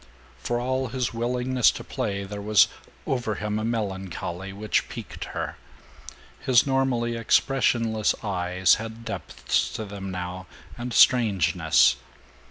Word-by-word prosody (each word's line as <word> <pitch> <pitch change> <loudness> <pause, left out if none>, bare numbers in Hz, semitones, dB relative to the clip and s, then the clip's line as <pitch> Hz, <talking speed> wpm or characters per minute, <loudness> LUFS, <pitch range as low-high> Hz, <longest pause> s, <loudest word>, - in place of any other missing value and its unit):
For 120 - -2
all 130 +1 -1
his 125 0 -2
willingness 125 +1 +2
to - - -4
play 100 -1 -3
there 100 +1 -6
was 105 0 +5 0.4
over 120 -5 -1
him 105 0 -2
a - - -3
melancholy 95 -4 -3
which 105 +2 -1
piqued - - -7
her. - - -5 0.8
His 125 -2 +4
normally 130 -3 +1
expressionless 115 -2 +2
eyes 90 -2 +2
had 115 +1 -8
depths 115 - -2
to 110 - -4
them 100 -1 -7
now, 90 0 -5 0.3
and 120 +1 -5
strangeness. 115 - +4
110 Hz, 125 wpm, -25 LUFS, 100-120 Hz, 0.8 s, was